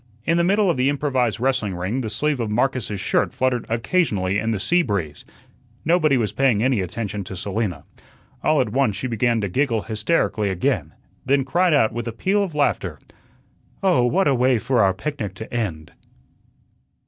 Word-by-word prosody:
In 165 Hz, +1 st, +2 dB
the 170 Hz, -, +3 dB
middle 200 Hz, +3 st, +3 dB
of 170 Hz, -, +1 dB
the 130 Hz, +2 st, +2 dB
improvised 130 Hz, -6 st, 0 dB
wrestling 125 Hz, -7 st, 0 dB
ring 95 Hz, +9 st, -2 dB
the 110 Hz, -, -3 dB
sleeve 145 Hz, +6 st, -1 dB
of 115 Hz, -2 st, -2 dB
Marcus's 115 Hz, -3 st, -1 dB
shirt -, -, +1 dB
fluttered 130 Hz, -2 st, 0 dB
occasionally 115 Hz, -, 0 dB
in 110 Hz, -, -2 dB
the 110 Hz, -3 st, -1 dB
sea 175 Hz, -, +2 dB
breeze. 100 Hz, -, -3 dB, 0.6 s
Nobody 155 Hz, -4 st, +3 dB
was 110 Hz, -4 st, -1 dB
paying 125 Hz, -6 st, +2 dB
any 125 Hz, -5 st, +2 dB
attention 100 Hz, +2 st, -4 dB
to 95 Hz, -, -7 dB
Selina. 95 Hz, -4 st, -3 dB, 0.6 s
All 155 Hz, -1 st, +3 dB
at 125 Hz, -, -1 dB
once 125 Hz, -4 st, +1 dB
she -, -, -4 dB
began 120 Hz, -1 st, +1 dB
to 100 Hz, -, -1 dB
giggle 115 Hz, +2 st, 0 dB
hysterically 110 Hz, -2 st, 0 dB
again, 90 Hz, -2 st, -1 dB, 0.3 s
then 135 Hz, +1 st, +2 dB
cried 175 Hz, +3 st, +2 dB
out 110 Hz, -6 st, +3 dB
with 120 Hz, 0 st, -4 dB
a -, -, -2 dB
peal 195 Hz, -, +1 dB
of 185 Hz, -6 st, -3 dB
laughter: 95 Hz, -, 0 dB, 0.9 s
"Oh, 180 Hz, -10 st, +3 dB
what 165 Hz, +10 st, +2 dB
a 140 Hz, -, +4 dB
way 130 Hz, 0 st, +3 dB
for 120 Hz, +2 st, +1 dB
our 95 Hz, -1 st, +3 dB
picnic 110 Hz, -, -4 dB
to 110 Hz, +3 st, -9 dB
end!" 90 Hz, -10 st, -3 dB
120 Hz, 185 wpm, -22 LUFS, 105-140 Hz, 0.9 s, a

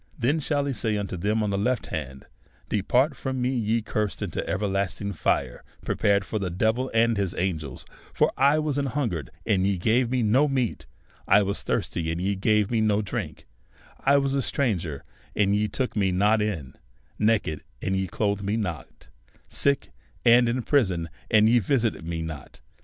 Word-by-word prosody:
Then 135 Hz, +7 st, +1 dB
shall 145 Hz, -1 st, 0 dB
he 140 Hz, -, -1 dB
say 110 Hz, -2 st, 0 dB
unto 100 Hz, -2 st, -3 dB
them 105 Hz, +5 st, 0 dB
on 105 Hz, -, -1 dB
the 100 Hz, -, 0 dB
left 125 Hz, +3 st, 0 dB
hand, 70 Hz, -4 st, -5 dB, 0.4 s
Depart 125 Hz, -, +2 dB
from 130 Hz, 0 st, -3 dB
me, 125 Hz, +1 st, +1 dB
ye 115 Hz, -1 st, 0 dB
cursed, 105 Hz, -2 st, -2 dB
into -, -, -3 dB
everlasting 100 Hz, 0 st, -1 dB
tire, 80 Hz, -, -1 dB, 0.2 s
prepared 100 Hz, -1 st, +2 dB
for 110 Hz, -, -3 dB
the 95 Hz, -2 st, -2 dB
devil 110 Hz, +8 st, 0 dB
and 115 Hz, 0 st, +3 dB
his 100 Hz, -3 st, -1 dB
angels; 80 Hz, -7 st, -3 dB, 0.3 s
for -, -, +2 dB
I 140 Hz, +3 st, +4 dB
was 150 Hz, -2 st, 0 dB
an 140 Hz, -, 0 dB
hinigered, 115 Hz, -, -2 dB, 0.2 s
and 95 Hz, -3 st, +2 dB
ye 100 Hz, -1 st, +1 dB
gave 115 Hz, +7 st, +2 dB
me 125 Hz, -1 st, +1 dB
no 125 Hz, +8 st, +4 dB
meat; 130 Hz, -5 st, -1 dB, 0.4 s
I 105 Hz, -, +6 dB
was 100 Hz, +1 st, -2 dB
thirsty, 80 Hz, -1 st, -2 dB
and 85 Hz, -, -3 dB
ye 100 Hz, +2 st, 0 dB
gave 105 Hz, +1 st, +2 dB
me 115 Hz, -2 st, +2 dB
no 105 Hz, -1 st, +2 dB
drink; 100 Hz, -, -5 dB, 0.5 s
I 140 Hz, +1 st, +4 dB
was 140 Hz, -1 st, +1 dB
a 140 Hz, -, +1 dB
stranger, 90 Hz, -, -1 dB, 0.3 s
and 100 Hz, -1 st, +3 dB
ye 105 Hz, +1 st, +1 dB
took 125 Hz, +5 st, -3 dB
me 100 Hz, -3 st, +2 dB
not 105 Hz, +4 st, +3 dB
in; 85 Hz, -12 st, -3 dB, 0.5 s
naked, 105 Hz, -8 st, +1 dB, 0.2 s
and 95 Hz, -, -1 dB
ye 95 Hz, 0 st, -1 dB
clothed 100 Hz, +2 st, -1 dB
me 100 Hz, +2 st, -1 dB
not; 90 Hz, -8 st, -5 dB, 0.4 s
sick, 140 Hz, -, 0 dB, 0.3 s
and 120 Hz, 0 st, +6 dB
in 125 Hz, +1 st, -1 dB
prison, 95 Hz, -, +1 dB, 0.2 s
and 110 Hz, -1 st, +5 dB
ye 120 Hz, +2 st, +5 dB
visited 115 Hz, -, 0 dB
me 85 Hz, -1 st, -3 dB
not. 80 Hz, -3 st, -8 dB
105 Hz, 185 wpm, -25 LUFS, 95-125 Hz, 0.5 s, I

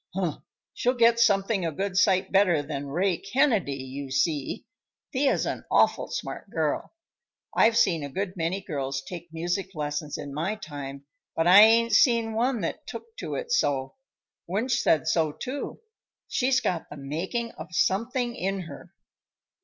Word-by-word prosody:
"Huh! 180 Hz, -5 st, -1 dB, 0.3 s
She'll 250 Hz, +2 st, 0 dB
get 235 Hz, -1 st, +4 dB
something 200 Hz, -2 st, +3 dB
a 165 Hz, -, -1 dB
good 190 Hz, +4 st, -3 dB
sight 190 Hz, -1 st, +3 dB
better 185 Hz, -6 st, +4 dB
than 140 Hz, -1 st, -5 dB
Ray 175 Hz, +5 st, 0 dB
Kennedy, 215 Hz, -, +1 dB
you 135 Hz, +1 st, -7 dB
see! 140 Hz, +1 st, -1 dB, 0.5 s
Thea's 270 Hz, +1 st, +2 dB
an -, -, -3 dB
awful -, -, +3 dB
smart -, -, -6 dB
girl. -, -, -2 dB, 0.6 s
I've 225 Hz, +1 st, +4 dB
seen 175 Hz, -9 st, +3 dB
a 140 Hz, -, -5 dB
good 190 Hz, +5 st, -3 dB
many 175 Hz, +3 st, -1 dB
girls 135 Hz, -6 st, -3 dB
take 175 Hz, +1 st, -8 dB
music 175 Hz, +3 st, -3 dB
lessons 150 Hz, 0 st, -3 dB
in 140 Hz, -, -7 dB
my 170 Hz, +9 st, -1 dB
time, 140 Hz, -7 st, -8 dB, 0.3 s
but 165 Hz, -, +1 dB
I 185 Hz, +4 st, +9 dB
ain't 230 Hz, +2 st, +6 dB
seen 230 Hz, 0 st, +4 dB
one 240 Hz, +1 st, 0 dB
that -, -, -4 dB
took 460 Hz, -1 st, -9 dB
to -, -, -4 dB
it 485 Hz, -1 st, -5 dB
so. 135 Hz, -, +1 dB, 0.5 s
Wunsch 220 Hz, +8 st, 0 dB
said 155 Hz, -5 st, +2 dB
so, 160 Hz, -3 st, +1 dB
too. 270 Hz, -, -6 dB, 0.5 s
She's 260 Hz, +1 st, +2 dB
got 170 Hz, -3 st, -2 dB
the 145 Hz, -, -9 dB
making 175 Hz, -, -3 dB
of 160 Hz, -, -9 dB
something 235 Hz, +7 st, 0 dB
in 195 Hz, +1 st, -2 dB
her." 160 Hz, -5 st, -11 dB
185 Hz, 160 wpm, -26 LUFS, 150-230 Hz, 0.6 s, I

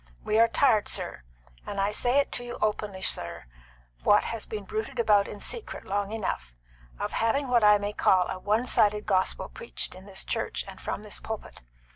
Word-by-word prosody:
We 215 Hz, +1 st, +2 dB
are 230 Hz, -, +7 dB
tired, 230 Hz, -3 st, +3 dB
sir -, -, 0 dB, 0.4 s
and 200 Hz, -, -5 dB
I 200 Hz, +1 st, +2 dB
say 245 Hz, +5 st, +2 dB
it 285 Hz, -, +2 dB
to 245 Hz, -, -3 dB
you 240 Hz, 0 st, -6 dB
openly, 210 Hz, -2 st, -1 dB
sir, 85 Hz, -6 st, -2 dB, 0.6 s
what 205 Hz, -, +5 dB
has 230 Hz, -2 st, -4 dB
been 210 Hz, -2 st, -5 dB
bruited 220 Hz, +5 st, -4 dB
about 210 Hz, -4 st, +4 dB
in 205 Hz, -, -8 dB
secret 460 Hz, -, -4 dB
long 200 Hz, +1 st, -1 dB
enough 65 Hz, -, -3 dB, 0.4 s
of -, -, -3 dB
having 260 Hz, +4 st, +1 dB
what 240 Hz, -3 st, +4 dB
I 210 Hz, 0 st, +7 dB
may 205 Hz, 0 st, -3 dB
call 185 Hz, -3 st, +3 dB
a 185 Hz, -, -4 dB
one 215 Hz, +5 st, +1 dB
sided 210 Hz, -3 st, +2 dB
gospel 190 Hz, -2 st, +1 dB
preached 475 Hz, -, -5 dB
in 185 Hz, +2 st, -13 dB
this 190 Hz, -1 st, -2 dB
church -, -, -2 dB
and -, -, -10 dB
from 210 Hz, -, -4 dB
this 210 Hz, -, -4 dB
pulpit. 220 Hz, -1 st, -7 dB
210 Hz, 195 wpm, -28 LUFS, 200-230 Hz, 0.6 s, are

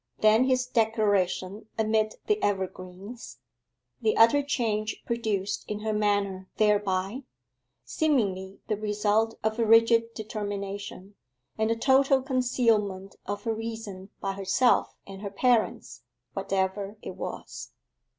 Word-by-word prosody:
Then 215 Hz, +3 st, +5 dB
his 255 Hz, -1 st, +2 dB
declaration 210 Hz, -4 st, 0 dB
amid 215 Hz, -1 st, +1 dB
the 425 Hz, 0 st, +1 dB
evergreens: 190 Hz, -, -4 dB, 0.6 s
the 220 Hz, -2 st, +1 dB
utter 230 Hz, +6 st, +6 dB
change 220 Hz, -6 st, -1 dB
produced 210 Hz, -4 st, -1 dB
in 210 Hz, 0 st, -4 dB
her 215 Hz, 0 st, -1 dB
manner 200 Hz, -3 st, 0 dB
thereby, 205 Hz, +1 st, +1 dB, 0.6 s
seemingly 200 Hz, -11 st, 0 dB
the 215 Hz, -, 0 dB
result 210 Hz, +1 st, +1 dB
of 220 Hz, +1 st, -1 dB
a -, -, +3 dB
rigid 230 Hz, +1 st, +4 dB
determination: 205 Hz, -2 st, -5 dB, 0.4 s
and 220 Hz, 0 st, 0 dB
the 230 Hz, -, +2 dB
total 265 Hz, +2 st, +4 dB
concealment 230 Hz, -7 st, +1 dB
of 205 Hz, +1 st, -4 dB
her 225 Hz, -, 0 dB
reason 220 Hz, -4 st, -6 dB
by 195 Hz, 0 st, -2 dB
herself 195 Hz, +6 st, +2 dB
and 195 Hz, 0 st, -10 dB
her 205 Hz, -, -4 dB
parents, 230 Hz, +3 st, 0 dB, 0.3 s
whatever 195 Hz, +2 st, -2 dB
it -, -, -5 dB
was. -, -, -7 dB
215 Hz, 120 wpm, -27 LUFS, 200-230 Hz, 0.6 s, utter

